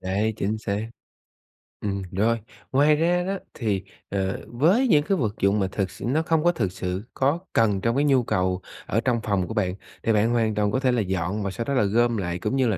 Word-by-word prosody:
Đấy, 100 +4 0
chính 110 0 -1
xác. 105 0 -2 1.0
Ừm, 100 -1 -1
rồi. 115 +5 +1 0.3
Ngoài 145 +3 +5
ra 175 +3 +2
đó 195 +2 -2 0.2
thì, 105 -6 -1 0.3
ờ, 95 -1 -1
với 175 - +3
những 150 -9 +4
cái 195 - +1
vật 110 - 0
dụng 100 +2 +3
mà 95 - +1
thực 95 -3 -2
sự 95 - -8
nó 140 +7 +2
không 160 -1 +1
có 175 - +5
thực 105 - -1
sự 90 +1 -4
có 140 +5 +1
cần 105 -4 +3
trong 115 +2 +1
cái 145 +2 +2
nhu 135 -3 +4
cầu 90 -3 0 0.2
ở 110 - 0
trong 120 0 +1
phòng 100 -4 0
của - - -5
bạn, 95 -4 0 0.3
thì 115 - +2
bạn 105 +2 +3
hoàn 115 -3 +1
toàn 105 -1 +1
có 130 - +1
thể 130 -2 +2
là 120 -2 +2
dọn 95 +1 -2
và 100 - -2
sau 115 +4 -4
đó 140 - -1
là 130 - +3
gom 115 +3 +2
lại, 90 -3 -2
cũng 130 - -1
như 130 -2 +3
là 110 -4 +1
110 Hz, 240 wpm, -25 LUFS, 100-130 Hz, 1.0 s, Ngoài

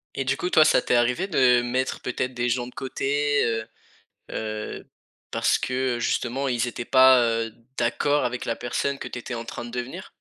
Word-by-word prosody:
Et 135 - -1
du 135 +1 0
coup, 180 - -2
toi, 155 -3 +6
ça 140 - +4
t'es - - +1
arrivé 125 +10 +2
de 125 -8 +4
mettre 130 +2 -1
peut-être 125 0 -3
des 120 0 -1
gens 120 0 -1
de 125 - -12
côté, 140 +3 0
heu 115 -1 -1 0.6
heu, 110 -1 -5 0.4
parce - - +2
que, 130 -1 -1
heu, - - -6
justement, 125 +3 -1
ils 120 -1 0
étaient 120 0 -5
pas, 130 -1 +7
heu, 115 -1 -1 0.2
d'accord 130 +4 +1
avec 125 0 -3
la 115 - -1
personne 135 +4 -2
que - - -5
tu 125 - -6
étais 120 - -7
en 115 0 -5
train 120 - -6
de 120 - -9
devenir? 125 +9 -5
125 Hz, 205 wpm, -25 LUFS, 120-135 Hz, 0.6 s, pas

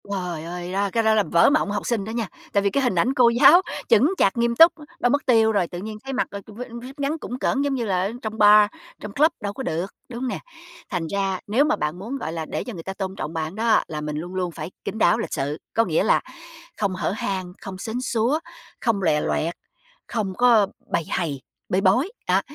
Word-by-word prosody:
Trời 180 -5 -3
ơi! 175 +1 -6
Đó, 200 +1 0
cái 230 - +2
đó 220 0 +4
là 215 -1 +3
vỡ 170 +3 +4
mộng 285 -8 +1
học 205 - -3
sinh 230 -5 0
đó 220 - -5
nha, 230 -2 -2 0.3
tại 200 - +3
vì 200 - +3
cái 275 +7 0
hình 245 -7 +1
ảnh 230 +10 +2
cô 250 -4 +5
giáo 275 +9 +7 0.3
chững 245 - +5
chạc 195 - +2
nghiêm 235 0 +1
túc, 330 +5 +8 0.3
đâu 245 - +2
mất 285 +3 +1
tiêu 225 -3 +4
rồi, 200 -5 +1
tự 175 - -7
nhiên 215 +3 -6
thấy 270 0 -5
mặc, 255 - 0
ơ, 200 - -6
v - - -11
jupe 250 +1 -8
ngắn 285 +2 -1
cũn 250 -5 -6
cỡn 270 +1 0
giống 285 -1 0
như 240 -3 -2
là 185 -3 +1
ở 195 +3 -1
trong 220 0 -5
bar, 210 0 +7 0.3
trong 210 - -7
club 310 +7 +4
đâu 205 -1 -3
có 265 - -6
được, 165 -3 -1 0.2
đúng 235 -1 -6
hông 260 - -1
nè? - - -3 0.5
Thành 175 -4 -2
ra 195 0 -1
nếu 240 +8 +3
mà 310 - +2
bạn 150 +3 -3
muốn, 235 +8 -5
gọi 165 -11 -4
là, 165 -1 -4
để - - -4
cho 245 - -7
người 165 -4 -8
ta 190 - -5
tôn 190 -1 -4
trọng 155 -3 -5
bạn 160 +2 -3
đó 225 0 +3
là 150 -1 -5
mình 150 0 -4
luôn 175 +4 -6
luôn 180 -2 -1
phải 160 +1 -7
kín - - -4
đáo, 220 - +4
lịch 230 - -4
sự. 145 +3 -2 0.2
Có 230 - +3
nghĩa - - +1
là - - +3 0.6
không 200 -3 -1
hở 185 - -1
hang, 190 -2 -3
không 190 -1 -7
sến 230 +4 -4
súa, 250 +3 +1 0.4
không 220 -5 0
lòe 150 -4 +2
loẹt, 165 +3 -1 0.5
không 210 -5 -2
có 235 -5 +5 0.2
bầy 170 - +1
hầy, 150 -7 -2 0.3
bê 185 - +1
bối, 245 - +3 0.2
đó. 185 +2 +3
205 Hz, 255 wpm, -23 LUFS, 180-240 Hz, 0.6 s, túc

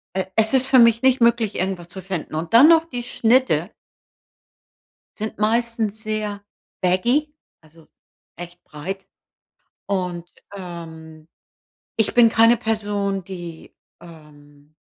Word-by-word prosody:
e 190 -1 -1
es 220 +2 +2
ist 260 0 +4
für 260 -2 +5
mich 230 0 +5
nicht 260 -2 +3
möglich, 235 -3 +2
irgendwas 185 -2 -3
zu 190 +1 -8
finden. 180 -4 -5
Und, 165 +6 -5
dann 260 +7 +8
noch 330 -1 +5
die 245 -6 -6
Schnitte 225 - +1 1.5
Sind 215 +1 -5
meistens 220 -1 -1
sehr 210 -2 -4 0.4
baggy, 240 +12 +1 0.3
also, 160 0 -22 0.5
echt 175 +1 -10
breit 190 +6 -7 0.8
und, 180 -3 -3 0.2
ähm, 160 -3 -10 0.7
ich 220 0 0
bin 235 -2 +6
keine 230 +1 +4
Person, 205 -4 -2
die, 175 -3 -9 0.3
ähm 150 -2 -17
200 Hz, 120 wpm, -21 LUFS, 170-230 Hz, 1.5 s, dann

